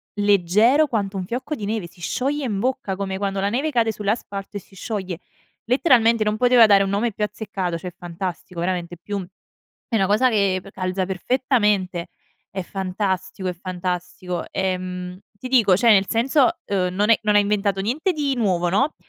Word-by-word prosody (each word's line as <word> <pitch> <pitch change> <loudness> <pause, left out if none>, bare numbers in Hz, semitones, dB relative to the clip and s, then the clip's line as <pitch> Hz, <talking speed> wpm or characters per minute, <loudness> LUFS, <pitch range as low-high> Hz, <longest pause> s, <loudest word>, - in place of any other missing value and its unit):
leggero 205 - +4
quanto 200 -5 -2
un 185 - -3
fiocco 250 - -4
di 215 - -6
neve. 210 -4 -2
Si 175 - -19
scioglie 275 - -1
in 205 -5 -2
bocca 255 -5 -1
come 190 -1 -3
quando 195 0 -2
la 200 +1 +1
neve 270 +8 0
cade 230 -3 +2
sull'asfalto 205 -1 -3
e - - -4
si 195 - -20
scioglie, 190 -4 -4 0.5
letteralmente 235 -3 +4
non 210 0 0
poteva 245 -1 +6
dare 200 -2 +5
un 195 - -2
nome 210 +4 0
più 210 - -3
azzeccato, 195 -5 -3
cioè 180 +2 -7
fantastico 175 0 -6
veramente 175 -1 -2
più 200 -1 -4 0.6
è 230 - -2
una 190 -2 +2
cosa 215 +5 +3
che 200 -4 +2
p 195 - -12
calza 185 0 -2
perfettamente, 200 -3 0 0.4
è 190 -1 -4
fantastico, 190 0 -3
è 180 - -1
fantastico. 180 0 -4
Ehm, 180 -1 -3 0.2
ti 255 - -7
dico, 220 -8 +4
cioè 235 +2 +5
nel 195 -2 +4
senso, 260 +4 +3 0.2
uhm, 190 -2 0
non 210 +3 +3
è - - +5
non 210 -1 +2
ha - - +7
inventato 200 -1 0
niente 290 - 0
di 285 -4 -1
nuovo, 185 -7 +1
no, 265 - +1
200 Hz, 180 wpm, -22 LUFS, 185-230 Hz, 0.6 s, ha